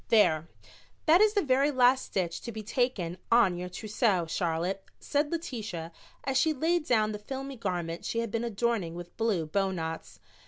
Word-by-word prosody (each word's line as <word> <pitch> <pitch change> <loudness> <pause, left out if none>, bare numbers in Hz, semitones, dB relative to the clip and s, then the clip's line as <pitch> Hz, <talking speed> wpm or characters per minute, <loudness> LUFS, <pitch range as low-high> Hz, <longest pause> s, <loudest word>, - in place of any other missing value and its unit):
"There, 165 -8 +4 0.6
that 335 +4 +6
is 430 0 +4
the 405 - +3
very 275 +1 +3
last 260 -1 +4
stitch 175 -3 -2
to 235 - -6
be 220 -1 -6
taken 210 -7 -1
on 230 -6 +5
your 180 +1 -5
trousseau, 205 -1 0
Charlotte," 175 +3 -1 0.2
said 290 +1 0
Letitia, 215 - -4 0.3
as 270 -1 +1
she 320 -1 +3
laid 325 +3 0
down 215 -3 +3
the 210 - -5
filmy 270 +5 -6
garment 175 -7 -3
she - - -3
had 230 -2 -1
been 230 +1 -1
adorning 225 -6 -1
with 175 0 -9
blue 215 -8 0
bowknots. 165 -2 -2
215 Hz, 170 wpm, -29 LUFS, 175-260 Hz, 0.6 s, that